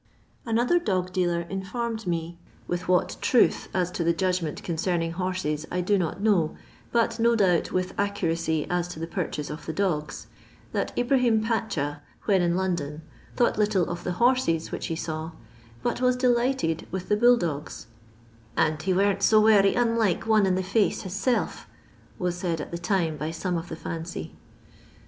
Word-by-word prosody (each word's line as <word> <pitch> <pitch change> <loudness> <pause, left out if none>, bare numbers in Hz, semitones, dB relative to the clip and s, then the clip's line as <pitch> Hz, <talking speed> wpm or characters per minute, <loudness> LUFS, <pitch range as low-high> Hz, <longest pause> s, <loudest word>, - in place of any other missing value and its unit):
Another 240 +9 +3
dog 185 - -1
dealer 175 -2 +1
informed 205 +5 -4
me 170 0 -2 0.2
— - - -29
with 175 +1 -3
what 180 0 +2
truth 245 - +3
as 180 -1 0
to 175 - -2
the 170 0 +3
judgment 180 -3 -1
concerning 170 0 -1
horses 175 -4 -2
I 180 - 0
do 205 +4 +2
not 180 -2 -1
know, 195 -7 +2 0.3
but 230 0 +1
no 235 +1 +4
doubt 185 -6 +2
with 185 0 -1
accuracy 165 -6 0
as 175 -1 0
to 175 -2 -8
the 165 - -2
purchase 165 -4 -4
of 150 - -8
the 160 - -2
dogs 155 -5 -2 0.2
— - - -28
that - - -1
Ibrahim 245 -3 +3
Pacha, 160 -11 -1 0.2
when 195 -3 +3
in 175 0 +2
London, 165 -5 -2 0.3
thought 240 -3 +2
little 205 -5 +2
of 170 0 -5
the 180 - -2
horses 235 -6 +2
which - - -4
he 165 - -2
saw, 160 0 -4 0.5
but - - -1
was 250 0 +3
delighted 245 -9 +1
with 185 0 -5
the 210 - +3
bull 240 +3 +6
dogs, 155 -7 -4 0.4
" - - -28 0.3
and 155 -1 +2
he 185 +3 0
weren't 200 +1 +2
so 215 +2 +5
werry 210 -2 +5
unlike 230 -6 +1
one 215 -3 +4
in 185 - +2
the 190 - -1
£ace 200 +3 +1
his 185 - -6
self," 235 +5 -1 0.5
was 180 -1 -1
said 175 -3 -2
at - - -6
the 170 - -4
time 175 -4 0
by 155 +1 -3
some 175 +2 -2
of 170 +1 -4
the - - -4
fancy. 160 - -6
180 Hz, 180 wpm, -26 LUFS, 165-215 Hz, 0.5 s, bull